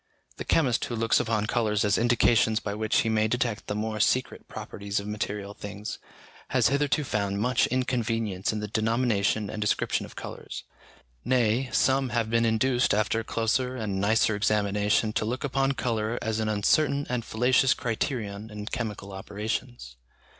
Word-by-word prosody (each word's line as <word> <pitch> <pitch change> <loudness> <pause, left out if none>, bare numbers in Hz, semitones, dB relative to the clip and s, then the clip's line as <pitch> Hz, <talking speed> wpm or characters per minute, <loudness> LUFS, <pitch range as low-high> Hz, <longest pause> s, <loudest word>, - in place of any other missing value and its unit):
The - - -5
chemist 130 -7 +2
who 120 - -4
looks 115 0 +2
upon 110 -2 0
colours 110 -2 +1
as 105 0 +3
indications 115 -2 +3
by 100 -1 -4
which 110 +1 +1
he - - -2
may 110 -1 +2
detect 115 -1 -1
the 105 - -2
more 110 0 -2
secret 130 +4 0
properties 100 0 -4
of 100 - -7
material 105 -1 -4
things, 105 +1 -7 0.5
has - - +3
hitherto 145 +2 +1
found 100 -5 -1
much 125 +3 +2
inconvenience 115 -6 -1
in 105 -1 -3
the 105 - -3
denomination 110 -1 +1
and 105 - -5
description 105 - 0
of - - -15
colours; - - -7 0.6
nay, 125 0 +2
some 135 -1 +2
have 115 -2 -1
been 115 0 +3
induced 120 +1 +2
after 110 +2 +1
closer 120 +3 0
and 105 -5 -2
nicer 110 +1 +3
examination 105 +1 +1
to - - 0
look 120 +6 -3
upon 135 0 +1
colour 115 -2 -1
as 110 -1 -2
an 110 -1 0
uncertain 140 +7 +2
and 125 -2 -2
fallacious 125 +4 +3
criterion 110 -3 -3
in 105 -1 -7
chemical 105 -4 -4
operations. 105 - -5
110 Hz, 160 wpm, -27 LUFS, 105-120 Hz, 0.6 s, as